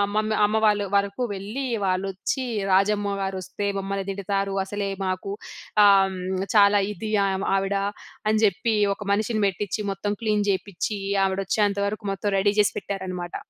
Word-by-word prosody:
Mummy 215 0 +1
అమ్మ 210 +1 +1
వాళ్ళ 205 -1 +2
వరకు 200 +4 +1
వెళ్లి, 215 +8 -4 0.2
వాళ్లొచ్చి, 190 +7 -1 0.3
రాజమ్మ 200 +1 +2
గారు 190 0 -2
వస్తే 200 +2 -4
మమ్మల్ని 195 0 -3
తిడతారు. 195 0 -2
అసలే 200 0 -3 0.2
మాకు, 185 +1 -2 0.5
ఆహ్, 195 -1 +5 0.4
చాలా 205 0 +6
ఇది 215 +2 -5 0.4
ఆవిడ, 195 +1 0 0.5
అని 215 0 +2
చెప్పి, 215 +3 +1 0.2
ఒక - - -21
మనిషిని 215 +1 0
పెట్టిచ్చి 195 +2 -2
మొత్తం 195 +1 -3
క్లీన్ 210 -2 +1
చేపిచ్చి, 200 +2 -3 0.3
ఆవిడ 190 0 -1
వచ్చేంత 205 0 +1
వరకు 215 +1 -4
మొత్తం 200 +1 -2
రెడీ 200 +1 +2
చేసి 205 - +4
పెట్టారనమాట. 185 -3 -5
200 Hz, 140 wpm, -24 LUFS, 195-210 Hz, 0.5 s, చాలా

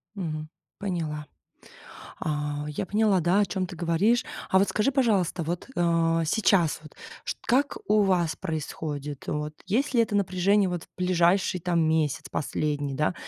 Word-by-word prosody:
Мгм, 155 -5 -4 0.3
поняла. 160 -6 -3 0.9
А, 150 -1 -2
я 150 +5 -3
поняла, 210 -1 +2
да, 175 +4 +3
о - - +3
чём 185 -1 -2
ты 180 - -9
говоришь. 175 +9 +2 0.3
А 190 - +4
вот 195 +1 +3
скажи, 215 +6 +1
пожалуйста, 205 - +1
вот, 170 - -4
а 165 -1 +2
сейчас 175 -3 +2
вот, 155 - -14 0.3
ш - - -2
как 275 +4 +2
у 210 0 +4
вас 175 -4 +2
происходит? 150 -4 -5
Вот 150 0 -2
есть 260 +8 +1
ли 235 - +5
это 215 -2 0
напряжение 195 +1 +2
вот 175 -2 -3
в - - -17
ближайший 180 0 +2
там 170 -1 +1
месяц 160 -3 +1
последний, 145 -1 -2
да? 150 +5 +1
175 Hz, 160 wpm, -26 LUFS, 155-200 Hz, 0.9 s, ли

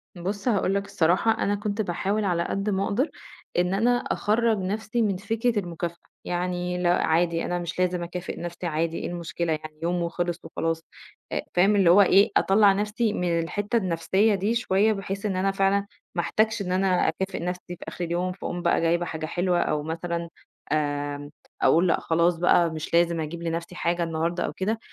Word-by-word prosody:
بُصّ، 195 +5 -4
هاقول 200 -4 +2
لَك 200 0 -1
الصراحة 180 +6 +2
أنا 205 -2 0
كنت 210 +1 -2
باحاول 200 +3 -1
على 175 -3 +1
قد 195 +4 -2
ما 195 -1 0
أقدر، 255 +10 0 0.5
إن 180 +1 +2
أنا 240 +5 +3
أخرّج 225 -1 +1
نفسي 215 +4 -2
من 200 -4 +1
فكرة 225 +3 0
المكافأة، 170 -2 -4 0.3
يعني 180 0 -2
لأ 175 0 +3
عادي 165 +1 +2
أنا 175 0 -1
مش 175 +1 -5
لازم 180 -1 +1
أكافئ 175 +1 -5
نفسي، 175 +1 -6
عادي 165 +1 -1
إيه - - -4
المشكلة 170 -1 -3
يعني 155 0 -7
يوم 175 +1 0
وخلِص 170 0 -2
وخلاص، 165 0 -2 0.5
آآ، - - -1
فاهم 195 +4 +4
اللي 195 -4 +5
هو 190 +4 +8
إيه 200 +2 +5
أطلّع 200 0 +5
نفسي 210 +2 0
من 175 -3 0
الحتّة 205 +7 -1
النفسية 190 +2 +2
دي 205 +4 0
شوية، 215 -2 +2
بحيث 195 0 -5
إن 200 -3 0
أنا 190 +1 +1
فعلًاً 195 +1 +2 0.3
ما 175 - +2
أحتاجش 220 +4 +1
إن 180 -2 -3
أنا 185 -1 +2
أكافئ 190 +4 -2
نفسي 180 0 -4
في - - -10
آخر 175 - -4
اليوم، 175 +2 -1
فاقوم 175 -1 -5
بقى 170 -1 +2
جايبة 170 +1 +2
حاجة 160 -1 -4
حلوة، 175 +2 0
أو 150 -1 0
مثلًا، 170 +1 -3 0.4
آآ، 145 -1 -1 0.3
أقول 170 +3 +4
لأ 165 - +2
خلاص 170 +1 +2
بقى 175 0 +4
مش 160 0 -6
لازم 170 0 +3
أجيب 160 +2 -4
لنفسي 170 +1 -3
حاجة 175 0 0
النهارده 165 +1 -1
أو - - -4
كده، 215 +4 -1
180 Hz, 190 wpm, -25 LUFS, 170-200 Hz, 0.5 s, هو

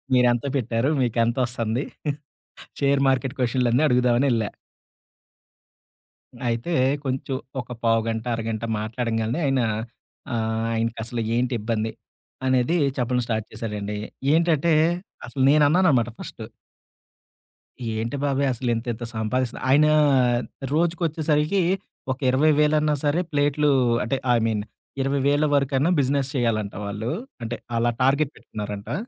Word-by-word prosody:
మీరు 125 -1 +5
ఎంత 120 +2 -1
పెట్టారు? 120 0 0
మీకెంతొస్తుంది? 120 0 0 1.0
Share 140 0 +3
market 130 0 0
క్వెషన్‌లన్ని 125 +1 +2
అడుగుదామనేళ్ళా. 125 -3 +2 2.0
అయితే 115 +8 -2 0.3
కొంచెం 130 0 -2 0.2
ఒక 125 - -10 0.2
పావుగంట, 115 0 +1
అరగంట 115 0 -3 0.2
మాట్లాడంగానే 115 +2 -2
ఆయన, 135 -1 +2 0.7
ఆహ్, 110 0 -1
ఆయనకసలు 115 +1 -2
ఏంటిబ్బంది? 115 -3 -1 0.5
అనేది, 130 +5 +2 0.2
చెప్పడం 125 0 0
స్టార్ట్ 110 -2 -2
చేశాడండి. 105 -2 -4 0.3
ఏంటంటే 165 0 +3 0.5
అసలు 135 - -3
నేన్నానన్నమాట 150 -4 +4
ఫస్టు. 110 - -8 1.5
ఏంటి 115 +5 -2
బాబాయ్ 140 0 +1
అసలు, 120 0 -2
ఇంత 115 +2 -4
ఇంత 120 +2 -7
సంపాదిస్త 120 +3 -1
ఆయన 150 +3 +6 0.9
రోజుకొచ్చేసరికి 160 +1 +1 0.5
ఒక 130 - -6
ఇరవై 145 +5 +4
వేలన్నా 150 0 +3
సరే 145 +4 +2
ప్లేట్లు, 145 0 +2 0.3
అంటే 135 - 0 0.2
ఐ - - +4
మీన్ 110 -2 0 0.4
20,000 140 +2 +2
వరకైనా, 140 +1 +2
బిజినెస్ 135 0 0
చేయాలంట 115 -5 0
వాళ్ళు. 105 +3 -3 0.3
అంటే 115 +1 -3 0.2
అలా 120 +1 +2
టార్గెట్ 140 +2 +3
పెట్టుకున్నారంటా. 105 +2 -6
125 Hz, 105 wpm, -24 LUFS, 115-140 Hz, 2.0 s, ఆయన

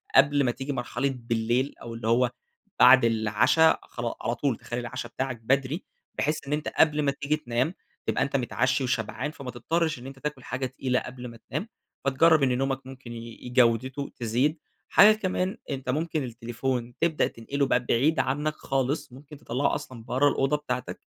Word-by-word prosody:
قبل 140 +1 +6
ما 125 - +2
تيجي 135 +3 -4
مرحلة 130 +1 -2
بالليل 120 +3 0
أو 115 - -7
اللي 115 -1 -5
هو 120 +2 +3 0.5
بعد 125 0 +8
العَشا 115 +8 +4
خلا 120 -1 -4
على 120 - -1
طول 125 -1 0
تخلي 120 - -5
العَشا 120 0 -5
بتاعك 130 +1 -3
بدري 135 - +1 0.4
بحيث 150 -1 -1
إن 145 - -1
أنت 150 0 -2
قبل 150 -1 +3
ما 140 -1 +2
تيجي 140 +2 -1
تنام، 130 +2 -1 0.3
تبقى - - +2
أنت 140 0 -3
متعشي 130 +1 +1
وشبعان، 125 +3 -2
فما 135 -5 -7
تضطرش 155 +4 -1
إن 125 - -9
أنت 135 0 -10
تاكل 145 -2 -4
حاجة 130 +2 -3
تقيلة 130 -1 -1
قبل 125 -1 -8
ما 115 -1 -11
تنام، 170 +9 -3 0.4
فتجرَّب 150 +3 +5
إن 125 -2 +2
نومك 135 0 -2
ممكن 130 -2 -10
ي 115 +1 -9
جودته 125 +3 +2
تزيد. 130 +6 0 0.3
حاجة 215 +1 +8
كمان 190 0 -1
أنت 135 -2 -4
ممكن 155 +2 0
التليفون 120 +1 -3
تبدأ 165 -2 +2
تنقله 140 +5 -2
بقى 125 -2 +1
بعيد 140 +7 +2
عنك 150 +4 0
خالص، 135 +1 -1
ممكن 145 +3 -12
تطلَّعُه 130 +2 0
أصلًا 130 -6 -7
برَّا 130 +5 +3
الأوضة 135 +2 +1
بتاعتك 125 -4 -4
130 Hz, 175 wpm, -27 LUFS, 120-145 Hz, 0.5 s, بعد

